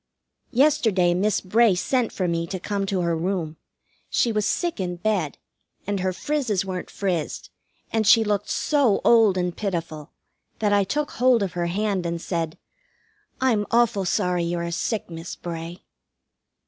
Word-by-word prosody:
Yesterday 235 -10 +3
Miss 200 +3 +1
Bray 215 +1 +3
sent 245 +5 0
for 185 - -2
me 170 0 -1
to 185 +1 -4
come 200 +1 -2
to 195 -2 0
her 170 -1 0
room. 165 -2 -2 0.5
She 235 - +2
was 210 -1 0
sick 345 - -1
in 180 -2 -2
bed, 180 -5 -1 0.5
and 200 0 -1
her 185 0 0
frizzes 225 -3 -1
weren't 185 -1 -5
frizzed, 180 -6 -3 0.4
and 220 -2 +1
she 225 0 +7
looked 205 -1 -1
so 275 -9 +2
old 225 -5 +5
and 180 -1 -1
pitiful 165 -7 -4 0.5
that 210 -2 +1
I 200 -1 +4
took 295 +8 -2
hold 245 -2 +3
of 190 - -3
her 175 -1 -1
hand 195 -1 -1
and 170 0 -3
said, 165 -2 -3 0.8
"I'm 230 -6 +1
awful 230 -5 +2
sorry 180 -2 +1
you 170 +1 -1
are 170 0 -3
sick, 215 +5 -2
Miss 165 0 -7
Bray." 170 +1 -7
195 Hz, 160 wpm, -24 LUFS, 175-220 Hz, 0.8 s, she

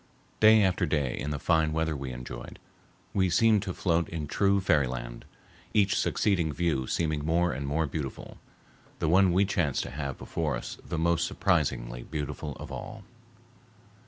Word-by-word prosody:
Day 110 0 +7
after 95 -2 +1
day 70 -5 0
in 75 - -4
the 75 - -2
fine 80 0 +2
weather 80 -1 0
we 70 -2 -5
enjoyed, - - -8 0.6
we 95 -2 +2
seemed 110 +4 +4
to 95 -2 -4
float 85 -2 +1
in 80 -3 -4
true 100 +6 +2
fairyland, 65 -9 0 0.5
each 100 -2 +4
succeeding 90 -7 +1
view 75 -5 -1
seeming 80 -3 -1
more 85 +3 +2
and 70 0 -4
more 80 +3 +1
beautiful, 70 -3 -6 0.6
the - - -1
one 95 +3 +5
we 95 +3 +3
chanced 85 -8 0
to - - -7
have 70 -2 -4
before 75 -5 -2
us - - -7
the - - -4
most 85 +1 +2
surprisingly 75 - 0
beautiful 75 +1 -5
of - - -9
all. 110 -2 -7
80 Hz, 160 wpm, -28 LUFS, 70-90 Hz, 0.6 s, Day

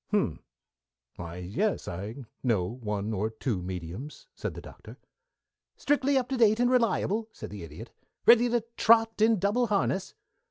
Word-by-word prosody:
"H'm! - - 0 0.8
Why 85 -1 -7
yes, 100 - -2
I 105 +9 -6 0.2
know 115 -8 +1
one 105 -1 -3
or 105 +2 -1
two 110 -3 -3
mediums," 90 - -7
said - - -5
the - - -7
Doctor. - - -13 0.8
"Strictly 280 -1 +2
up 250 -2 0
to 265 - -1
date 220 -1 +4
and 245 +1 +3
reliable?" 225 -2 +1
said - - -9
the 105 -2 -7
Idiot. 80 -2 -10 0.3
"Ready 240 +1 +7
to 240 0 +1 0.2
trot 225 -1 +4
in 220 0 +5
double 205 +6 +1
harness?" 195 -2 0
190 Hz, 155 wpm, -28 LUFS, -, 0.8 s, Ready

